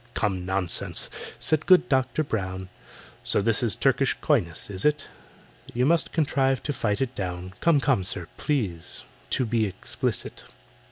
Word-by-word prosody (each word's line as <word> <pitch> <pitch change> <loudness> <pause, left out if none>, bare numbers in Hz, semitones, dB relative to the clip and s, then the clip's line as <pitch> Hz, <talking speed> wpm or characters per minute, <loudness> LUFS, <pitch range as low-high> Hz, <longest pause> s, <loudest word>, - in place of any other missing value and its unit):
"Come, 95 -4 -1
nonsense!" 95 -2 -1 0.3
said 155 0 +3
good 180 -1 +6
DOCTOR 130 +2 +1
BROWN. 95 -7 -4 0.5
"So - - +3
this 105 +1 +3
is 115 -4 +4
Turkish 135 0 +2
coyness, 100 - +1
is 95 -1 -1
it? 150 0 +2 0.7
You 125 +1 +2
must 165 +2 +2
contrive 135 -4 +1
to 145 - -2
fight 105 -4 -1
it 130 -1 -1
down— 90 -2 -5
Come, 165 -4 +4
come, 135 -9 +1
sir, 90 -1 0
please 100 - -2 0.3
to 130 - 0
be 110 -1 +1
explicit." 95 - -3
120 Hz, 150 wpm, -25 LUFS, 95-140 Hz, 0.7 s, good